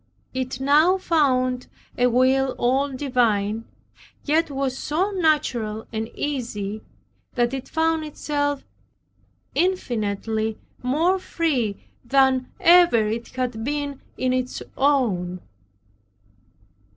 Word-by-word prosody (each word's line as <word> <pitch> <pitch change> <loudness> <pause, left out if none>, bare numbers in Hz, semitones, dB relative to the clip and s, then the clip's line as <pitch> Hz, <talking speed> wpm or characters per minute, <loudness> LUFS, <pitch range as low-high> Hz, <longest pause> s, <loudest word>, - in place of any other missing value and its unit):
It 255 -1 -3
now 300 +7 +4
found 255 -8 +1 0.3
a 245 - +3
will 260 +2 +3
all 265 +4 +2
divine, 230 -5 0 0.6
yet 320 +2 +2
was 270 -2 -2
so 345 +9 -1
natural 260 - 0
and 220 +1 -3
easy 220 -7 -3 0.5
that 240 0 +1
it 270 -1 -5
found 320 0 +1
itself 290 -2 -2 0.9
infinitely 220 - -1 0.2
more 325 +9 +2
free 265 - -1 0.2
than 265 0 +2
ever 340 -10 +6
it 225 +2 -3
had 250 -3 -2
been 285 +1 -3 0.2
in 255 0 +1
its 255 0 -2
own. 215 -11 +1
260 Hz, 100 wpm, -23 LUFS, 235-295 Hz, 0.9 s, ever